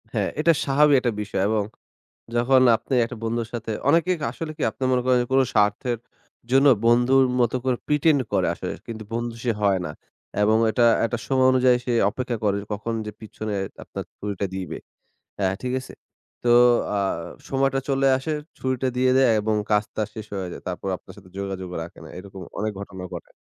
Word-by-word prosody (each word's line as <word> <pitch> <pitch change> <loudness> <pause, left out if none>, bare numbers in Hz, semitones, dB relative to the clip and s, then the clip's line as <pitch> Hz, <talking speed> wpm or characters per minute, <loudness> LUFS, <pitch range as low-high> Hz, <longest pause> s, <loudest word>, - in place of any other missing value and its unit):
হ্যাঁ - - 0
এটা 165 +2 +5
স্বাভাবিক 145 +1 +4
একটা 125 -1 0
বিষয় 100 -2 -2
এবং 110 -1 +1 0.7
যখন 130 +2 +4 0.2
আপনি 135 - -6
একটা 120 +1 -8
বন্ধুর 115 0 -1
সাথে, 115 -1 -4 0.2
অনেকে 170 +2 +3
ক - - -13
আসলে 155 +5 -5
কি - - -2
আপনার 130 - -2
মনে 125 -1 +2
করেন, 130 -1 +4
কোন 135 0 +5
স্বার্থের 105 +3 +2 0.5
জন্য 135 +2 +5 0.2
বন্ধুর 120 +3 +5 0.2
মতো 120 0 +2
করে 130 -2 +1
pretend 150 0 +3
করে - - +2
আসলে - - -5
কিন্তু 110 -2 -6
বন্ধু 120 0 -2
সে 120 - +2
হয় 100 -2 +3
না 75 - -4 0.5
এবং 110 +1 +4
এটা 120 +1 +3 0.2
একটা 120 +1 -2
সময় 130 -1 +3
অনুযায়ী 130 -1 +4
সে 125 - 0 0.2
অপেক্ষা 125 0 -3
করে 100 -1 +2 0.2
কখন 105 +3 -3
যে, 105 - -5
পিছনে 110 -1 -5 0.3
আপনার - - -6
ছুরিটা 100 -1 -3
দিবে। 95 -2 -4 0.6
অ্যা 95 - +2
ঠিক 125 0 -2
আছে? - - -11 0.5
তো 120 - +2 0.5
আ - - +1 0.5
সময়টা 135 0 +1
চলে 135 0 +2
আসে, 135 +4 -4 0.3
ছুরিটা 130 0 -1
দিয়ে 130 0 +3
দেয় 135 -2 +5
এবং 110 +1 0 0.2
কাজ 105 0 +4
তার 110 -1 -1
শেষ 110 -2 -6
হয়ে 95 -2 -3
যায়। - - -8
তারপর 90 +1 -4
আপনার - - -15
সাথে 95 -2 -15
যোগাযোগ 95 -2 -4
রাখে 85 - -9
না। - - -11
এরকম 95 0 -10 0.2
অনেক 110 +1 -1
ঘটনা 95 -2 -8
ঘটে। - - -8
120 Hz, 185 wpm, -24 LUFS, 105-130 Hz, 0.7 s, এটা